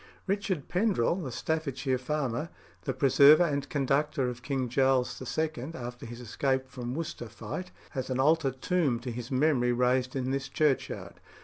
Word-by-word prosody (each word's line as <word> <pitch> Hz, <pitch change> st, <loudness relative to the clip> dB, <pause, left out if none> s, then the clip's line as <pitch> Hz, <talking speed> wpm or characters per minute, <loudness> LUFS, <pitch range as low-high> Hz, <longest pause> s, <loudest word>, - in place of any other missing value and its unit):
Richard 195 Hz, -6 st, -1 dB
Pendrell, 185 Hz, -, +1 dB
the 130 Hz, -, -4 dB
Staffordshire 140 Hz, -2 st, -1 dB
farmer, 140 Hz, +1 st, -2 dB, 0.4 s
"the 130 Hz, -, 0 dB
preserver 140 Hz, +4 st, +7 dB
and 145 Hz, -4 st, -1 dB
conductor 140 Hz, 0 st, +1 dB
of 120 Hz, -1 st, -7 dB
King 130 Hz, -1 st, -1 dB
Charles 130 Hz, +1 st, +2 dB, 0.2 s
II. 155 Hz, -2 st, -2 dB
after 120 Hz, -2 st, -7 dB
his 120 Hz, +1 st, -8 dB
escape 130 Hz, +2 st, -1 dB
from 125 Hz, -1 st, -5 dB
Worcester 155 Hz, -7 st, -5 dB
Fight," 115 Hz, -, -6 dB, 0.2 s
has 130 Hz, -1 st, -4 dB
an 130 Hz, 0 st, -1 dB
altar 155 Hz, +1 st, +4 dB
tomb 135 Hz, -1 st, 0 dB
to 125 Hz, 0 st, -4 dB
his 120 Hz, 0 st, -6 dB
memory 130 Hz, -2 st, +2 dB
raised 125 Hz, +1 st, +1 dB
in 130 Hz, -1 st, -1 dB
this 135 Hz, 0 st, -2 dB
churchyard. 150 Hz, -4 st, -1 dB
135 Hz, 155 wpm, -29 LUFS, 125-150 Hz, 0.4 s, preserver